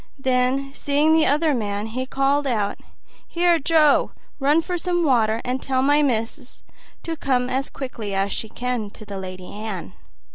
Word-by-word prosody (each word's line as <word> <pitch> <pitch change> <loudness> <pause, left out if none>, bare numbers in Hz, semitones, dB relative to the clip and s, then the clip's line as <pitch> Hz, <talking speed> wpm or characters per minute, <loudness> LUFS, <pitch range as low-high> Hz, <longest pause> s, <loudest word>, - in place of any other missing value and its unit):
Then, 265 +1 0
seeing 290 +3 +2
the 320 -1 +4
other 300 +2 +2
man, 205 -4 -2
he 255 +4 -4
called 275 +2 +1
out, 210 -5 -1 0.5
"Here, 345 -1 +2
Joe, 305 -1 +3 0.3
run 295 +4 +3
for 360 - -3
some 350 0 0
water, 230 -6 +2
and 255 +1 -2
tell 260 -1 0
my 290 +2 +4
missis 250 0 -2 0.4
to 330 - -3
come 255 -4 0
as 265 +2 -1
quick 260 -3 -7
as 200 -2 -1
she 220 - -4
can 245 -3 -3
to 215 - -13
the 200 -1 -6
Lady 185 -1 -8
Anne." 205 - -6
260 Hz, 170 wpm, -22 LUFS, 220-290 Hz, 0.5 s, the